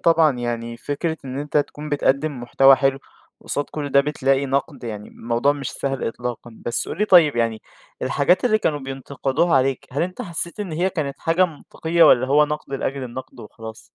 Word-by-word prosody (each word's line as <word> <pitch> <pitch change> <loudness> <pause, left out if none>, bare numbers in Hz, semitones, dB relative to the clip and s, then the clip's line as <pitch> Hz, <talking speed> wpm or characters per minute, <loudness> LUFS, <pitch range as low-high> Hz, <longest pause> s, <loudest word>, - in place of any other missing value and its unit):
طبعًا 160 -5 +4
يعني 120 -1 -3
فكرة 150 +6 -3
إن 130 0 -5
أنت 145 +1 -3
تكون 150 +1 -1
بتقدم 145 -1 0
محتوى 135 +2 +5
حلو، 135 -1 +1 0.4
وقصاد 145 - -2
كل 150 -2 -4
ده 140 - +6
بتلاقي 140 -1 +1
نقد، 140 0 -2
يعني 105 -2 -6
الموضوع 120 +5 0
مش 140 -3 -5
سهل 135 -1 -3
إطلاقًا. 120 0 -6 0.2
بس 120 - -1
قل - - -6
لي 210 - +3
طيّب 170 - +6
يعني 115 -2 0 0.4
الحاجات 180 - +2
اللي 215 -3 +3
كانوا 150 -7 0
بينتقدوها 135 +3 -1
عليك 130 0 0
هل 140 - 0
أنت 185 +7 -4
حسّيت 170 0 -5
إن 195 -5 -4
هي 180 +4 0
كانت 140 -5 -3
حاجة 165 +3 +3
منطقيّة 165 +1 -1
والّا 130 -4 +6
هو 145 +3 +5
نقد 150 -2 -5
لأجل 135 0 -3
النقد 130 +1 -8
وخلاص؟ 110 +1 -10
140 Hz, 185 wpm, -22 LUFS, 130-155 Hz, 0.4 s, ده